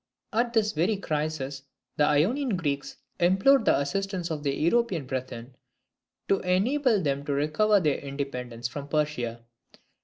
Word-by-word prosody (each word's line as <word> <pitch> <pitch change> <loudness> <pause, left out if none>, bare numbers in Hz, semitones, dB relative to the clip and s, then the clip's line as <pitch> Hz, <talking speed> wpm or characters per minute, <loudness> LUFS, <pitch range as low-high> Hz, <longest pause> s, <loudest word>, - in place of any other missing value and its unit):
At 235 +2 +1
this 215 -2 +2
very 180 +7 +1
crisis 150 -5 -3 0.3
the 150 - +3
Ionian 210 - +2
Greeks 145 -4 -3 0.2
implored 190 +10 +4
the - - +4
assistance 180 +4 -2
of 155 -2 -3
their 140 -1 0
European 175 - +1
brethren, 130 -1 -6 0.7
to 195 - +2
enable 220 +6 +2
them 140 -1 -1
to 145 - -1
recover 155 +9 +3
their 150 -6 +1
independence 125 -4 -5
from 140 +4 -7
Persia. 135 -7 -2
155 Hz, 140 wpm, -27 LUFS, 140-195 Hz, 0.7 s, implored